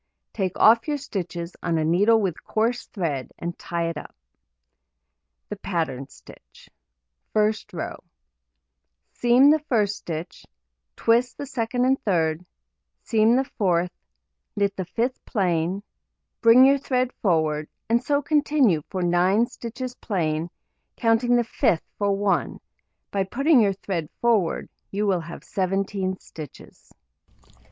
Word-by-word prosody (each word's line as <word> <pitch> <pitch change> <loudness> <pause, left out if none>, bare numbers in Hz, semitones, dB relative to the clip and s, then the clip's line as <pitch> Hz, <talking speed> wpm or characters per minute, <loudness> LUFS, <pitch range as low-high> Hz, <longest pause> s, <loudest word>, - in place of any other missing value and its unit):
Take 190 -4 -2
off 230 +3 +5
your 295 -1 0
stitches 180 - -5
on 170 -2 0
a 155 - 0
needle 205 +8 +4
with 190 -6 -2
coarse 230 +3 -1
thread, 155 - -3
and 170 0 -5
tie 170 -1 -2
it 165 -2 -4
up. - - -12 1.3
The - - -5
pattern 160 -8 -3
stitch: - - -17 0.6
First 215 0 +1
row: 175 - -6 1.1
Seam 245 +4 +5
the 310 - +4
1st 235 -9 +1
stitch, 170 -4 -6 0.5
twist 235 +2 +2
the - - -5
2d 250 -2 -1
and 265 +1 +1
3d, 165 -4 +1 0.6
seam 225 +1 +3
the 265 +1 +1
4th, 180 -3 +2 0.6
knit 200 -1 0
the 185 -2 -4
5th 240 +6 -1
plain, 180 -2 -1 0.6
bring 235 +3 +8
your 275 +1 +5
thread 255 -2 0
forward, 155 -5 +1 0.2
and 235 +2 +2
so 290 +1 +1
continue 290 - +2
for 185 -1 -2
9 180 +6 +3
stitches 245 +2 -7
plain, 165 -7 -2 0.5
counting 235 +1 +2
the 240 - +3
5th 175 -7 +1 0.2
for 200 -1 +2
1; 200 0 0 0.5
by 195 -1 +1
putting 275 - +3
your 200 -2 +3
thread 185 -5 -4
forward, 220 -8 +1 0.2
you 205 +2 -1
will 190 -4 +1
have 170 +1 -9
17 190 0 -1
stitches. 155 -6 -12
200 Hz, 130 wpm, -24 LUFS, 175-240 Hz, 1.3 s, bring